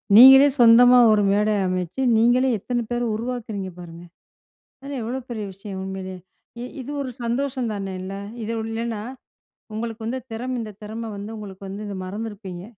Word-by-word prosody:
நீங்களே 265 +4 +10
சொந்தமா 245 +1 +8
ஒரு 210 -1 +4
மேடை 210 +1 +2
அமைச்சு, 185 +5 -2 0.2
நீங்களே 245 +3 +4
எத்தனை 240 +4 -2
பேரை 240 0 0
உருவாக்குறீங்க 220 -4 -4
பாருங்க. 170 -1 -10 0.8
அதெல்லாம் 275 -2 -5
எவ்வளோ 250 +4 -3
பெரிய 220 -3 -4
விஷயம் 195 0 -8
உண்மையிலே. 190 -1 -6 0.5
இ - - -4 0.2
இது 265 +3 -7
ஒரு 260 -2 -4
சந்தோஷம் 250 +1 -1
தானே? 195 -2 -4
இல்ல. 190 +1 -6 0.3
இது 220 - -3
உ - - -4
இல்லன்னா 225 -1 -3 0.7
உங்களுக்கு 225 0 -5
வந்து 250 +3 -2
திறம் 250 +3 -3
இந்த 220 -2 -5
திறமை 225 +2 -6
வந்து 200 +2 -7
உங்களுக்கு 200 -2 -9
வந்து 200 +2 -6
இத 205 - -5
மறந்துருப்பீங்க. 195 -2 -6
220 Hz, 160 wpm, -23 LUFS, 195-245 Hz, 0.8 s, நீங்களே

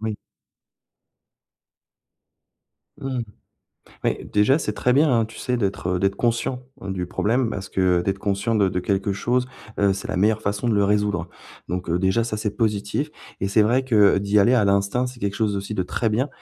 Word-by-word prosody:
Oui. 110 -1 -2 2.9
Mmh. 130 -2 -3 0.8
Mais - - -1
déjà 105 +8 +4
c'est 105 -8 -3
très 125 - +1
bien 145 +3 +4
hein, 115 -2 +3
tu 110 - -11
sais 125 -1 -1
d'être, 100 -4 -2
heu, - - 0
d'être 100 +1 0
conscient, 120 +2 -1 0.2
heu, 100 - -5
du 90 -2 -3
problème 115 +6 0
parce 95 -3 -5
que 90 -2 +2
d'être 95 +1 -1
conscient 100 +3 -1
de 100 -3 +3
de 90 - -2
quelque 95 +1 -1
chose, 125 +5 0 0.3
heu, 100 -1 +3
c'est 95 - -6
la 90 - -2
meilleure 110 +2 +2
façon 105 +4 -1
de 110 - +2
le 100 0 +3
résoudre. 105 -4 0 0.4
Donc 90 0 -4
heu, 85 +1 +1
déjà 95 +5 +2
ça 110 -2 -3
c'est 105 -1 -3
positif 110 +6 -1 0.3
et 95 - 0
c'est 105 +1 +4
vrai 125 +5 +2
que 105 -6 +4
d'y 100 +1 +2
aller 105 +5 +5
à 115 -5 +4
l'instinct 100 +6 +1
c'est 125 -1 -9
quelque 100 -2 -2
chose 105 -3 0
aussi 100 +2 -4
de 95 - 0
très 110 +5 -1
bien 125 +7 0
105 Hz, 195 wpm, -23 LUFS, 100-120 Hz, 2.9 s, aller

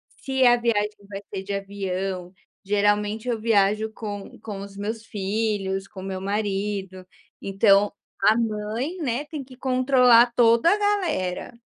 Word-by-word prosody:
se 265 -1 0
a 240 0 +7
viagem 210 -3 0
vai 195 -1 -6
ser 190 0 -4
de 200 - -7
avião, 195 -2 -4 0.3
geralmente 205 +3 +1
eu 235 -2 0
viajo 215 0 +2
com 205 -2 -7
com 205 -3 -7
os 200 0 -10
meus 220 +2 -4
filhos, 200 -2 -2
com 190 - -10
meu 190 -1 -5
marido, 195 -2 -3 0.4
então 195 +1 +3 0.3
a 215 +2 +6
mãe, 225 - -2
né, 270 +1 -1
tem 295 -2 -6
que 255 -1 -15
controlar 255 -2 +4
toda 235 +6 +5
a - - +1
galera. 345 - -1
210 Hz, 145 wpm, -24 LUFS, 195-235 Hz, 0.4 s, a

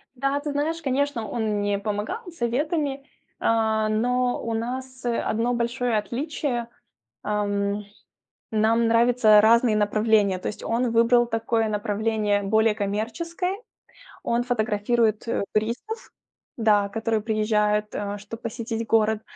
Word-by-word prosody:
Да, 275 +2 0
ты 295 0 -4
знаешь, 320 +3 -1
конечно, 270 -4 -1
он 215 -2 -1
мне 205 0 0
помогал 210 - -3
советами, 280 +1 -1 0.3
а, 220 -1 +1
но 245 +3 +1
у 230 - -3
нас 255 +3 -4
одно 235 0 0
большое 240 0 0
отличие, 245 +1 -3 0.5
ам, 205 0 -1 0.7
нам 225 +1 +2
нравятся 230 -2 +5
разные 230 +1 +4
направления. 210 -1 +2
То 185 - -5
есть 210 - -6
он 235 +1 0
выбрал 235 +1 +4
такое 225 -1 0
направление 210 0 0
более 220 +2 +2
коммерческое. 235 - -2 0.7
Он 235 +1 +1
фотографирует, 220 -1 0
э, 230 - 0
туристов, 235 - -2 0.5
да, 210 -3 +3
которые 225 +1 -1
приезжают, 210 -1 +1
э, 205 0 -3
чтобы 210 +3 -10
посетить 230 -1 -4
город. 220 -1 +2
225 Hz, 120 wpm, -24 LUFS, 210-245 Hz, 0.7 s, нравятся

